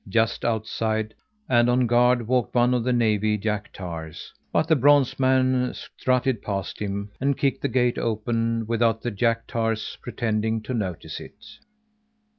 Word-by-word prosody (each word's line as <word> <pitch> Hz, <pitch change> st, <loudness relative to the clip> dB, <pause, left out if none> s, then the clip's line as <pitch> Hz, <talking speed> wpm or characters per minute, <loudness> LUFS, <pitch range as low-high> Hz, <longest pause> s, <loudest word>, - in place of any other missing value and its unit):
Just 110 Hz, +3 st, +1 dB
outside 110 Hz, -1 st, -1 dB, 0.3 s
and 120 Hz, -1 st, +4 dB
on 125 Hz, +1 st, +3 dB
guard 120 Hz, 0 st, +3 dB
walked 125 Hz, -3 st, 0 dB
one 120 Hz, +1 st, +4 dB
of 125 Hz, -2 st, +1 dB
the 125 Hz, -, 0 dB
navy's 110 Hz, -3 st, +2 dB
jack 105 Hz, 0 st, -2 dB
tars, 85 Hz, -4 st, -8 dB, 0.2 s
but 160 Hz, -, +1 dB
the 160 Hz, -, +4 dB
bronze 140 Hz, -1 st, +4 dB
man 130 Hz, -1 st, +2 dB
strutted 125 Hz, -3 st, -1 dB
past 100 Hz, -2 st, -4 dB
him 100 Hz, 0 st, -4 dB
and 140 Hz, 0 st, +1 dB
kicked 140 Hz, -1 st, 0 dB
the -, -, 0 dB
gate 125 Hz, -1 st, +1 dB
open 115 Hz, 0 st, -1 dB
without 115 Hz, 0 st, +1 dB
the 120 Hz, -, -2 dB
jack 115 Hz, +2 st, 0 dB
tar's 115 Hz, -2 st, -2 dB
pretending 110 Hz, -1 st, -1 dB
to 130 Hz, -, -4 dB
notice 95 Hz, -8 st, -4 dB
it. -, -, -13 dB
115 Hz, 155 wpm, -24 LUFS, 110-125 Hz, 0.3 s, and